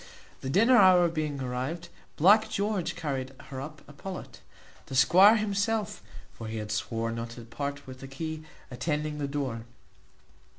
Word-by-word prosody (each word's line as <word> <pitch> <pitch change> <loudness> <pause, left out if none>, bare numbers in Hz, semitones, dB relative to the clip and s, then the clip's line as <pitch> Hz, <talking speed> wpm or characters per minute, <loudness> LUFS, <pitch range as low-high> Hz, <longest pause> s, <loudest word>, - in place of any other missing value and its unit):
The 130 - -5
dinner 230 - +5
hour 185 -4 +6
being 155 -3 -3
arrived, 130 +7 -4 0.3
Black 205 +7 +5
George 200 -5 -1
carried 135 -4 -3 0.2
her 130 -1 -5
up 155 +2 -9
a 145 - -13
pullet, 185 +6 -8 0.5
the 135 - -6
squire 190 - +7
himself 215 +1 -1 0.3
(for 115 - -8
he 110 0 -4
had 105 -1 -5
sworn 115 +2 -2
not 115 0 -4
to - - -7
part 140 +5 -5
with 130 -1 -10
the 135 - -8
key) 155 +3 -5 0.3
attending 150 +3 -2
the 145 - -1
door. 135 -5 -3
150 Hz, 160 wpm, -28 LUFS, 130-185 Hz, 0.5 s, squire